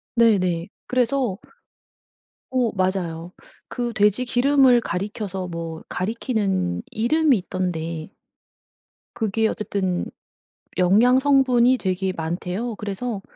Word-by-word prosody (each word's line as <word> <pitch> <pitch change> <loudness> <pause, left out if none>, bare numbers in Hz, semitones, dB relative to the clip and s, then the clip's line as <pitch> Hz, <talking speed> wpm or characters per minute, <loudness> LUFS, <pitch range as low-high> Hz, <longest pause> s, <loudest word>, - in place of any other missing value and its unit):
네네. 185 -7 +3 0.2
그래서 250 -4 0 1.1
어 250 -3 +1
맞아요. 180 -3 -2 0.4
그 240 -2 -3
돼지기름을 245 +4 +4
가리켜서 195 -1 -4
뭐 165 -2 -6
가리키는 195 - -1
이름이 275 +4 +2
있던데 170 -4 -4 1.1
그게 220 0 +1
어쨌든 190 -4 -2 0.7
영양 215 +8 +5
성분이 260 -3 +4
되게 190 -2 -1
많대요. 180 +8 -3
그래서 210 +2 -4
205 Hz, 215 characters per minute, -23 LUFS, 180-245 Hz, 1.1 s, 영양